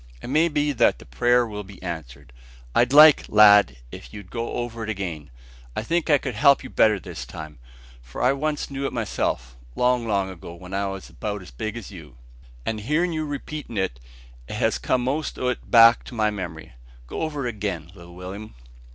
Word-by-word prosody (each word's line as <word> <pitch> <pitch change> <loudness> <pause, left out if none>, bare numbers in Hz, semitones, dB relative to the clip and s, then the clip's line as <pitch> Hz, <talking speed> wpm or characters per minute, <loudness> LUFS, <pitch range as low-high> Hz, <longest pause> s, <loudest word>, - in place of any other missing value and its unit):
It - - -8
may 155 +4 +4
be 150 -2 0
that 125 - +3
the - - -14
prayer 120 - +2
will 105 -2 -6
be 95 -1 -13
answered. 70 -7 -7 0.4
I'd 120 +1 +3
like, 150 +1 +8
lad, 105 - +6
if - - -10
you'd 100 -3 -11
go 115 0 -4
over 115 -1 -4
it 110 - -5
again. 85 -8 -4 0.5
I - - -2
think 170 +8 -1
I 145 - +6
could 130 -2 -5
help 140 +7 +4
you 130 - -9
better 110 -2 +4
this - - -8
time; 75 +3 -9 0.4
for - - -10
I 125 +2 +4
once 150 +1 -2
knew 135 0 -2
it - - -6
myself, 80 - -2 0.2
long, 125 -1 +1
long 100 -3 +1
ago, 85 -1 -10
when 90 +2 -11
I 100 0 0
was 95 -1 -7
about 105 -2 -5
as 90 - -13
big 110 - -5
as 115 - -8
you, 80 -9 -12 0.5
and 110 -1 -2
hearin' 155 +10 0
you 155 -1 -2
repeatin' 145 -4 -6
it, 95 -11 -1 0.5
it - - -6
has - - +1
come 125 -1 0
most 145 +5 -2
o' 125 - 0
it 125 - -5
back 115 0 +8
into 125 - -11
my 110 -1 +2
memory. 85 -9 -7 0.3
Go - - -6
over 150 -4 -3
it - - 0
again, 95 -6 -4
little 85 -2 -13
Will'm." 95 - -8
105 Hz, 205 wpm, -24 LUFS, 90-130 Hz, 0.5 s, like